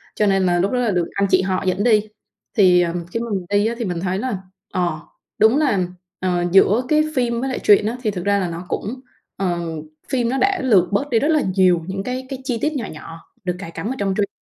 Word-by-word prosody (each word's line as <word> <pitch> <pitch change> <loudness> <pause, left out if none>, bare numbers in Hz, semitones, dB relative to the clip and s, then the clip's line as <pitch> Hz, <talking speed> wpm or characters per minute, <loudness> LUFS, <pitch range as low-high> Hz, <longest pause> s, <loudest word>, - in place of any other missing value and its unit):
cho 210 - +2
nên 195 -1 +2
là 175 -1 +2
lúc 195 +3 +1
đó 255 - 0
là 235 -3 +1
được 175 -3 +1
anh 200 0 +1
chị 185 - +4
họ 185 0 -1
dẫn 185 +2 +1
đi. 215 -3 +3 0.5
Thì, 180 -3 +6
ờ, 170 -1 0 0.2
khi 230 - -2
mà 235 - -4 0.2
đi 205 +1 +2
á, 235 - -2
thì 235 - -3
mình 175 -2 -3
thấy 185 +1 -1
là, 230 -3 -2 0.4
ờ, 175 -4 -1 0.4
đúng 220 +5 +5
là, 280 -11 +2 0.4
ờ, 180 -1 0
giữa 200 +5 +5
cái 305 0 +4
phim 235 -2 0
với 270 - -1
lại 260 - -3
truyện 205 0 +5
á 230 +3 -2
thì 215 - +1
thực 180 -3 -5
ra 200 0 +3
là 185 - -1
nó 170 +1 -6
cũng, 250 +5 -4 0.4
ờ, 180 -3 -1 0.5
phim 245 -3 0
nó 265 - 0
đã 390 -1 +1
lược 200 -9 +3
bớt 270 +9 0
đi 230 - +3
rất 290 - +1
là 310 -2 +3
nhiều 180 -3 +4
những 195 +1 -3
cái 255 +3 -4
cái 270 - -5
chi 250 -3 -1
tiết 310 +1 0
nhỏ 255 -6 -3
nhỏ 165 +1 -10 0.2
được 180 -1 -2
cài 170 -4 -7
cắm 205 - -5
ở - - -3
trong 195 -1 0
truyện. 205 -1 +1
200 Hz, 260 wpm, -20 LUFS, 185-245 Hz, 0.5 s, Thì